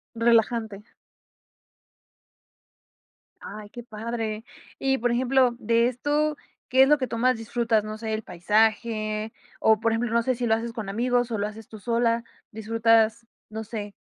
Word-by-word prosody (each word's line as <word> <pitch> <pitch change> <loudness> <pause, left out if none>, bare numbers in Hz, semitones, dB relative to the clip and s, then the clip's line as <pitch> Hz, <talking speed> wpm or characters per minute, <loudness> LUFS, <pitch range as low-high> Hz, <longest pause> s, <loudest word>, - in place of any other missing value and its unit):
Relajante. 225 -2 +1 2.6
Ay, 210 0 -9
qué 240 - -8
padre. 225 -1 -4 0.3
Y 270 0 0
por 240 +2 +1
ejemplo, 250 0 +2
de 230 +1 +2
esto, 295 +4 0 0.3
¿qué 260 +1 +6
es - - +4
lo 295 0 +5
que 255 - -1
tú 230 0 -4
más 255 +1 +2
disfrutas? 225 -1 0
No 215 0 -6
sé, 220 0 -4
el 215 - -2
paisaje, 215 +3 0 0.3
o 220 -1 +4
por 230 0 +1
ejemplo, 230 +1 -1
no 235 - +4
sé 255 +2 0
si 240 +1 -2
lo 220 - +3
haces 230 +1 -2
con 220 -4 -5
amigos, 245 +3 0
o 220 - -1
lo 205 - 0
haces 215 0 -10
tú 220 - -11
sola. 230 +1 +1 0.3
Disfrutas, 225 +1 +2 0.2
no 220 +1 -5
sé. 210 -2 -7
230 Hz, 160 wpm, -25 LUFS, 215-240 Hz, 2.6 s, qué